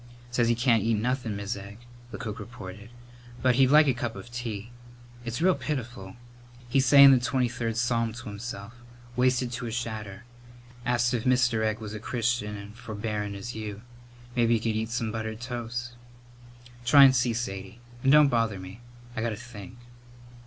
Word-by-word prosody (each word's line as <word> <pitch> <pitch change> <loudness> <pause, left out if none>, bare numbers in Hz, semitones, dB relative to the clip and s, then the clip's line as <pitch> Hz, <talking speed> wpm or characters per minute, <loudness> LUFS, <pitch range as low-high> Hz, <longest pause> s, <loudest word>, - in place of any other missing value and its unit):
"Says 120 -1 +2
he 120 - +3
can't 115 -2 +3
eat 115 +2 +1
nothin', 120 0 -1
Mis' 100 +2 -3
Egg," 100 +1 -9 0.3
the 105 - -7
cook 110 0 -5
reported, 105 -3 -9 0.5
"but 130 -1 +5
he'd 135 -1 +6
like 150 +2 +7
a 135 - +4
cup 120 -2 -4
of 100 +5 -10
tea. 115 -2 -5 0.5
It's 120 +7 -3
real 185 0 +5
pitiful. 120 - -5 0.5
He's 130 +2 +2
sayin' 140 0 +9
the 130 - +6
Twenty 125 0 +1
third 115 -1 -3
Psalm 120 -1 +1
to 120 - -9
himself. 100 0 -7 0.4
Wasted 125 0 +2
to 120 0 -4
a - - -4
shadder. 110 -3 -5 0.6
Asked 120 0 +2
if 115 -2 -1
Mr. 125 -3 +3
Egg 110 -1 0
was 110 -1 -7
as 105 - -6
Christian 115 -3 -1
an' 100 0 -9
forbearin' 105 -2 -4
as 100 +5 -6
you. 105 -1 -6 0.5
Mebbe 120 -2 +3
he 115 -1 +4
could 110 0 -1
eat 110 +1 -2
some 115 -2 -2
buttered 110 0 -4
toast." 120 0 -4 0.9
"Try 140 +4 +8
and 135 -1 +7
see, 120 -1 +2
Sadie; 100 -2 -5 0.2
and 135 - +3
don't 150 0 +8
bother 115 -6 +1
me. 95 +3 -9 0.4
I - - -2
got 115 - 0
to 110 - -3
think." 120 0 -10
115 Hz, 180 wpm, -27 LUFS, 105-125 Hz, 0.9 s, sayin